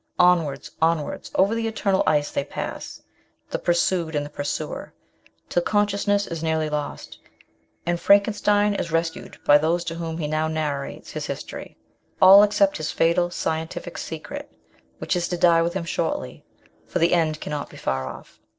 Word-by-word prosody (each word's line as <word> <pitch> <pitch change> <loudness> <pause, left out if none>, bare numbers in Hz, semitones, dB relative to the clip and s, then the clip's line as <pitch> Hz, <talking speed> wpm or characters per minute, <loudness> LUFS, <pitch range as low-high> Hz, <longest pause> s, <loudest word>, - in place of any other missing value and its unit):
Onwards, 170 -6 +2
onwards, 160 -2 0
over 195 +3 +3
the 230 0 -1
eternal 200 -3 +1
ice 145 -1 +2
they - - -1
pass, 140 - -6 0.5
the - - -1
pursued 170 -2 +1
and 145 0 0
the 145 - -10
pursuer, 145 -1 -4 0.5
till 175 - +1
consciousness 205 +1 +1
is 165 -2 -5
nearly 160 -1 0
lost, 150 -1 -5 0.7
and 175 0 0
Frankenstein 205 +1 +3
is 170 -4 -3
rescued 165 0 -2
by 145 0 +7
those 165 +3 +1
to 165 - -4
whom 165 -1 -4
he 160 - -2
now 155 +1 0
narrates 150 -3 -3
his - - -4
history; - - -7 0.4
all 195 +2 +9
except 205 -1 +3
his 155 0 -3
fatal 170 +1 +2
scientific 160 -2 -4
secret, - - -7 0.5
which - - -1
is 175 -1 0
to 175 - -2
die 170 -1 +5
with 170 +2 -1
him 180 -3 -2
shortly, 170 - -3 0.4
for - - -2
the 170 0 +3
end 160 -3 +1
cannot 150 -1 -4
be - - -13
far 65 0 -2
off. 65 - -11
170 Hz, 165 wpm, -24 LUFS, 155-190 Hz, 0.7 s, all